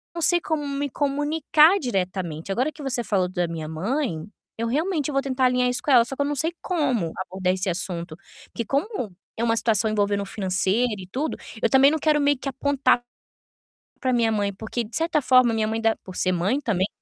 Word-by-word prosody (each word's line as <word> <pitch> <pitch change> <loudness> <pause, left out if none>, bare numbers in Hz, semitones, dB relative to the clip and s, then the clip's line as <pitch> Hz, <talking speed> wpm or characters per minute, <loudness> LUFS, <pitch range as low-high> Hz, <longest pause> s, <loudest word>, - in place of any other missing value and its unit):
não 335 - -4
sei 345 +2 +4
como 300 -3 -2
me 280 0 -2
comunicar 300 +5 +3
diretamente. 185 - -3
Agora 255 +9 0
que 300 - -13
você 255 -3 -2
falou 190 -5 +1
da 175 -2 -1
minha 160 -2 -5
mãe, 185 - -2 0.3
eu 230 +1 -2
realmente, 305 +3 -1
eu - - -4
vou 275 - +2
tentar 260 -1 0
alinhar 250 0 +2
isso 245 - -1
com - - -3
ela, 235 -2 +6
só 270 - -6
que 285 - -3
eu - - +2
não 290 - -1
sei 320 +5 0
como 260 - 0
abordar 185 0 -1
esse 190 +1 -3
assunto, 170 -2 -2 0.3
porque 235 - -5
como 280 - -2 0.3
é 230 - -1
uma 230 -1 +2
situação 220 -1 +2
envolvendo 205 -1 +1
o - - -4
financeiro 200 +4 +1
e 185 - -9
tudo, 295 +5 -2 0.2
eu - - +4
também 270 +1 +6
não 315 - +1
quero 300 0 +2
meio 285 -1 +3
que 275 - -7
apontar 270 -2 +1 1.0
pra 255 -2 0
minha 230 -2 +2
mãe 205 -1 0
porque 220 +3 -4
de 220 - -13
certa 325 -1 +1
forma 255 -2 +5
a - - -1
minha 215 -1 0
mãe 225 +1 -2
dá 225 0 +2
por 185 - -9
ser 185 - +1
mãe 195 +11 0
também 200 -8 0
245 Hz, 220 wpm, -24 LUFS, 195-285 Hz, 1.0 s, ela